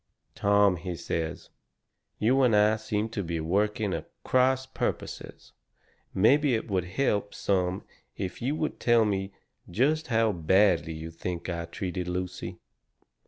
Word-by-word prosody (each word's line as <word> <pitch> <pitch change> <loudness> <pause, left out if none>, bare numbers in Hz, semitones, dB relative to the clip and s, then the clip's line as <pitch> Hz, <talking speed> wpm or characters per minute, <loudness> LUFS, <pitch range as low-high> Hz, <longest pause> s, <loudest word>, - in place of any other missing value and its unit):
"Tom," 100 -2 +3
he 90 +1 -5
says, 85 -1 -4 0.7
"you 130 +5 +3
and 125 -4 +4
I 105 +1 +4
seem 110 0 -2
to 110 -2 -3
be 85 -1 -3
working 100 +4 0
at - - -5
cross 130 +1 +2
purposes. 130 - -5 0.6
Maybe 135 +6 +4
it 110 - -3
would 95 -4 0
help 105 0 -1
some 95 -1 0 0.3
if 95 -2 -5
you 135 +5 0
would 155 0 -3
tell 120 -2 +4
me 95 -1 -1 0.4
just 150 - +1
how 115 -2 +2
badly 90 -1 +3
you 80 +1 -7
think 85 +2 -5
I 85 -1 -3
treated 90 +1 -4
Lucy." 90 +1 -4
100 Hz, 140 wpm, -28 LUFS, 90-115 Hz, 0.7 s, and